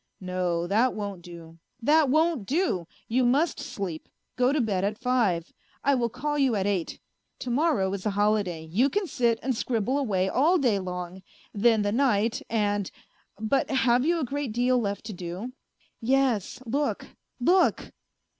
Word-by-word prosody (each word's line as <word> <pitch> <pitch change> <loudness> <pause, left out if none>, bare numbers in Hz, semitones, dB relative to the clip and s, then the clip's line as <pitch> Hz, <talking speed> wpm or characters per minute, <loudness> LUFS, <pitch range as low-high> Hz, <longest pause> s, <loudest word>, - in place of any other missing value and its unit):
" - - -50
No, 180 -2 -1
that 220 +7 +2
won't 200 -4 -5
do, 170 -1 -12 0.2
that 295 +4 +4
won't 310 - +2
do: 275 - 0 0.2
you 250 +3 +1
must 280 +7 +2
sleep, 195 - -5 0.3
go 250 +1 +3
to 295 - +1
bed 205 -6 0
at 210 +1 -1
five. 225 -10 0 0.3
I 280 - +3
will 240 -3 +1
call 295 +5 -2
you 265 -5 +3
at 195 -2 0
eight. 195 -5 -1 0.4
To 250 - -5
morrow 250 - +1
is 195 -2 -4
a 200 -1 -2
holiday; 205 -6 +1
you 215 - +2
can 410 +4 -1
sit 235 -8 +1
and 260 -1 0
scribble 240 +3 0
away 195 -9 0
all 305 - +3
day 240 - +2
long.... 180 0 -6 0.3
Then 220 0 +3
the 205 - 0
night 230 -3 +1
and 205 -3 0 0.5
but 220 +5 0
have 255 -2 +3
you 335 +3 +2
a 300 - -1
great 275 -2 -3
deal 250 +2 +2
left 200 -2 -3
to 220 - -5
do? 180 +7 -6 0.2
" - - -41
" - - -45
Yes, 255 -2 +1
look, 280 +5 -1 0.3
look 355 +8 +2
230 Hz, 175 wpm, -26 LUFS, 195-265 Hz, 0.5 s, that